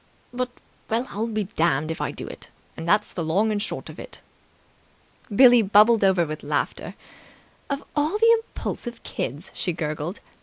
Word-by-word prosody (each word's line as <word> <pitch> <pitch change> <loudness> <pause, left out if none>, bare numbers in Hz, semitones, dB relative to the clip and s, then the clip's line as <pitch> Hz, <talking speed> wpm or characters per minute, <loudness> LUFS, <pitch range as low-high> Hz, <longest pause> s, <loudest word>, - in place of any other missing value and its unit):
but... 250 0 -2 0.4
well, 230 +3 0
I'll 220 +3 -2
be 215 -2 -1
damned 160 -5 0
if 160 - -5
I - - -1
do - - -6
it, - - -10 0.3
and 165 +1 -5
that's 210 +2 +2
the 170 - -3
long 195 +8 +2
and 205 -1 -1
short - - -4
of - - -10
it!" - - -10 1.2
Billie 245 0 +8
bubbled 210 +2 +5
over 190 -3 +4
with 155 0 -6
laughter. - - -2 0.7
"Of 280 0 -2
all 305 +7 +1
the 460 +1 +5
impulsive 240 - -6
kids!" 145 +9 -5
she 180 - -1
gurgled. 155 +2 -4
210 Hz, 165 wpm, -24 LUFS, 165-240 Hz, 1.2 s, Billie